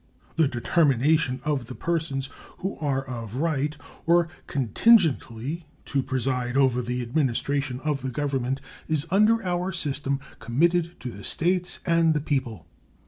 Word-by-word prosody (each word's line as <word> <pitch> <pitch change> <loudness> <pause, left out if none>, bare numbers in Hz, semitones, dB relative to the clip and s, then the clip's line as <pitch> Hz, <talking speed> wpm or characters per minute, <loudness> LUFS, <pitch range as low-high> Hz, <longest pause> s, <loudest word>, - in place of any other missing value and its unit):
The 160 -3 +4
determination 135 +1 +2
of 140 -6 -1
the 125 - -7
persons 160 -5 -1 0.3
who 190 +2 -3
are 135 -3 -1
of 115 -3 -6
right, 150 0 0 0.3
or 170 0 +4 0.2
contingently, 145 - +2 0.2
to 140 - 0
preside 130 -1 -1
over 130 -3 +3
the 125 +1 -2
administration 135 0 0
of 150 -3 -1
the 130 - -3
Government 135 -1 -1 0.3
is 155 -2 +1
under 215 +2 +4
our 180 +1 -1
system 140 -5 -1 0.2
committed 170 +7 +1
to 125 - -5
the 100 -1 -10
States 180 +1 0
and 165 -2 +3
the - - +2
people. 130 - -2
140 Hz, 140 wpm, -26 LUFS, 130-165 Hz, 0.3 s, The